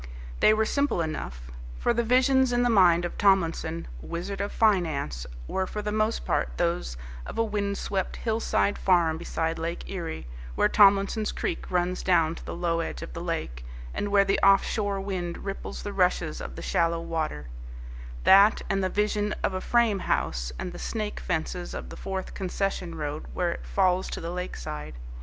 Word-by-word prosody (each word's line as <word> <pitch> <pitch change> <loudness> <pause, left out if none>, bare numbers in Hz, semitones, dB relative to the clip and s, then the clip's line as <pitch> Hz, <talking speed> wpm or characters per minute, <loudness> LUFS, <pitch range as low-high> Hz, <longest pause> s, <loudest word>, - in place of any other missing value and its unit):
They - - +6
were 220 0 +3
simple 280 -8 +1
enough. 60 - -5 0.3
For - - +1
the 235 - +1
visions 255 +2 +4
in 245 0 +2
the 245 - +3
mind 175 -4 +5
of 175 - -6
Tomlinson, 165 -4 +2
Wizard 185 - -4
of 200 - -2
Finance, 155 - +1 0.2
were 190 0 -1
for 210 +2 -5
the 210 - -2
most 215 +1 0
part - - +1
those 170 - -1 0.3
of - - -7
a 225 - +3
wind 200 -2 -1
swept 190 -2 -2
hillside 220 -2 0
farm 170 -4 +3
beside 165 -1 -2
Lake 165 +1 -4
Erie, 165 - -4 0.3
where - - +4
Tomlinson's 200 +1 +4
Creek - - -3
runs 180 0 0
down 165 -3 +3
to - - -10
the - - -6
low 170 -1 0
edge 165 - -4
of - - -8
the - - -5
lake, - - -3 0.3
and 205 - -2
where 200 -1 +5
the 195 - +1
off 195 0 +6
shore 205 -2 -1
wind 185 -3 -4
ripples 195 -1 -5
the 205 - -4
rushes 180 -4 +1
of - - -7
the - - -7
shallow 170 0 +1
water: 160 - -3 0.8
that, 200 +3 +6
and 195 0 +1
the 185 - +1
vision 210 +1 0
of - - +1
a 185 - -2
frame 235 -3 +2
house, - - -1
and 180 - -4
the 175 - -8
snake 215 -2 -3
fences 175 +2 -3
of - - -6
the - - -8
fourth 190 -1 -5
concession 185 -2 -2
road 150 -1 -4
where 175 -1 +1
it - - -7
falls 185 -1 +2
to - - -4
the 165 +1 -4
lakeside. 75 - -5
185 Hz, 185 wpm, -27 LUFS, 165-205 Hz, 0.8 s, They